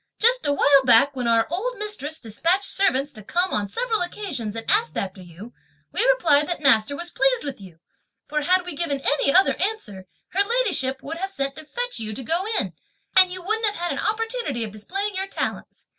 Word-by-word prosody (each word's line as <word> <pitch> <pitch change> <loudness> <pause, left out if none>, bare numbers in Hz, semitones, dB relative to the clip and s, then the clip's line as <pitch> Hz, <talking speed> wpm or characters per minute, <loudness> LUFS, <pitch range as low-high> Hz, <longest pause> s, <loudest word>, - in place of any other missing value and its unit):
just 485 -1 +3
a - - +2
while 280 -1 +4
back 260 +3 +5
when 250 -2 -2
our 230 -1 +3
old 480 +9 -3
mistress 415 -8 -3
despatched 335 - 0
servants 290 -9 0
to 215 - -9
come 355 - -1
on 205 -1 0
several 445 - -1
occasions 330 - -4
and 225 - -5
ask 425 +5 +1
after 190 -1 -4
you, 185 +7 -12 0.4
we - - +2
replied 305 -12 +4
that 350 - -3
master 270 -3 +3
was 345 +4 -6
pleased - - +1
with 275 -7 -6
you; 180 -4 -13 0.5
for 300 0 -1
had 360 +3 +2
we 355 - -5
given 285 -3 -1
any 280 0 +2
other 380 +6 +5
answer, 210 - -3 0.2
her 390 - +1
ladyship 400 - +1
would 325 +3 -6
have 385 +3 -3
sent 275 -8 -3
to 315 - -10
fetch 485 +10 -3
you 215 -1 -4
to 260 - -6
go 335 +9 -1
in, - - -3 0.4
and 370 -1 +8
you 365 -1 -7
wouldn't 440 +3 0
have 415 - -1
had 350 -2 -2
an - - -3
opportunity 450 - -2
of 215 - -5
displaying 390 - -3
your 385 +1 -3
talents. - - -5
330 Hz, 210 wpm, -23 LUFS, 255-400 Hz, 0.5 s, and